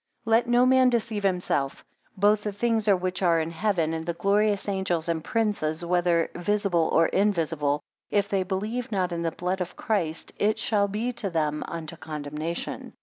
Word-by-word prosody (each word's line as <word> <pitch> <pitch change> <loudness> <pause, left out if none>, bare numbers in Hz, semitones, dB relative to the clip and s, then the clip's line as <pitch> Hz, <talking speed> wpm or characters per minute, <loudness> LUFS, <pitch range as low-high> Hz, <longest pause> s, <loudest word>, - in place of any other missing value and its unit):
12 225 - -4
Let 230 +1 +4
no 245 +1 +5
man 260 0 +5
deceive 230 -3 -1
himself; 180 -8 -1 0.3
both 205 +2 +4
the 210 - -3
things 220 +1 0
which 185 -2 +1
are 170 -3 +4
in 160 +1 -2
heaven, 170 -3 0
and 160 0 -3
the 170 0 -3
glorious 200 +3 +1
angels, 190 -4 -1
and 165 -2 -1
princes, 175 -8 -1
whether 175 -1 +2
visible 175 -2 +1
or 165 - +5
invisible, 165 -8 +1 0.3
if 200 -1 +1
they 195 -2 0
believe 210 +7 -3
not 185 -3 0
in 170 -1 -2
the 165 - 0
blood 180 +3 -2
of 180 0 -4
Christ, 170 -7 -2
it 215 +1 +2
shall 205 -3 +1
be 215 +5 -2
to 235 -5 -4
them, 150 -3 -1
unto 165 0 -6
condemnation. 155 +2 -5
185 Hz, 180 wpm, -26 LUFS, 165-210 Hz, 0.3 s, no